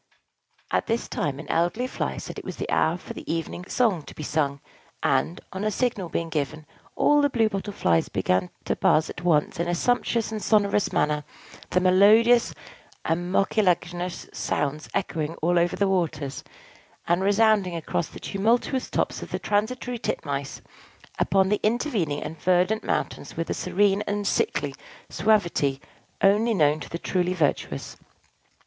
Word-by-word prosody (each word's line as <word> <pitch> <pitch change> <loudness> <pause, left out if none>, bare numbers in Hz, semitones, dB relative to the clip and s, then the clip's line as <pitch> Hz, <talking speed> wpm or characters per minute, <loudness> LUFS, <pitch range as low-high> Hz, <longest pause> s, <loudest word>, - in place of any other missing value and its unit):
At - - 0
this 230 +1 -1
time, 140 -2 -2
an 145 0 -9
elderly 175 +12 +1
Fly 255 - -3
said - - -6
it - - -11
was - - -6
the - - -4
hour 160 +2 +2
for - - -9
the - - -6
evening 165 +2 -4
song 220 -9 +1
to - - -11
be 155 - -6
sung; 140 -2 0 0.4
and, 175 - +1
on 190 +2 -4
a 215 - +2
signal 210 -5 -1
being 165 0 -2
given, 155 0 -3 0.3
all 295 0 +4
the 285 - +3
Blue 230 -4 +2
Bottle 200 0 -4
Flies 85 - +1
began 90 -1 0 0.2
to - - 0
buzz 155 +1 +2
at 180 - -9
once 160 -4 +2
in 170 - 0
a 175 - 0
sumptuous 235 +2 0
and 215 -1 -4
sonorous 205 -2 +2
manner, 150 0 +1 0.5
the 180 - +2
melodious 210 +6 +5 0.5
and 175 +2 -1
mucilaginous 180 -3 0
sounds 150 +1 -2
echoing 165 -4 -2
all 175 +2 +2
over 175 +1 +1
the 200 - +1
waters, 155 -7 -1 0.6
and 175 +2 +2
resounding 205 -3 +3
across 165 0 -2
the - - -11
tumultuous 235 +6 0
tops - - -1
of - - -7
the - - -2
transitory 240 +4 -1
titmice 140 -8 -3 0.6
upon 195 -1 +3
the 210 - +1
intervening 215 - 0
and 155 +1 -7
verdant 185 +4 +2
mountains - - -3
with 165 - -2
a - - +2
serene 195 +2 +1
and 205 0 -1
sickly 145 -6 0 0.4
suavity 170 -8 +2 0.4
only 215 +4 +4
known 150 -3 +3
to - - -8
the 170 - -4
truly 180 +1 -1
virtuous. 155 -5 -1
180 Hz, 165 wpm, -25 LUFS, 160-210 Hz, 0.6 s, melodious